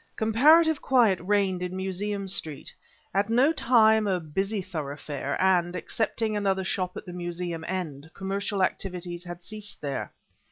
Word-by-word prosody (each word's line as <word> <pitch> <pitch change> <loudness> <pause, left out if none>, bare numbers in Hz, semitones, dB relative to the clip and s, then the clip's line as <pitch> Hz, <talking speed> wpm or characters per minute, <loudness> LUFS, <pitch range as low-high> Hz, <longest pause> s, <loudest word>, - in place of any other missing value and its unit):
Comparative 300 +8 +5
quiet 235 -8 +4
reigned 190 -1 +1
in 180 0 -3
Museum 195 +2 -3
Street, 160 -6 -4 0.4
at 200 +3 +1
no 255 +7 +4
time 220 -6 +4
a 185 -2 +1
busy 195 +7 -2
thoroughfare, 145 -5 -4
and, 180 -2 +3
excepting 220 +2 -1
another 195 -2 +1
shop 185 -1 -2
at - - -7
the 180 - -8
Museum 175 -1 -4
end, 160 -5 -4
commercial 195 0 -1
activities 180 -2 -3
had 175 0 -8
ceased 205 0 -7
there. 140 -2 -4
190 Hz, 145 wpm, -27 LUFS, 175-210 Hz, 0.4 s, Comparative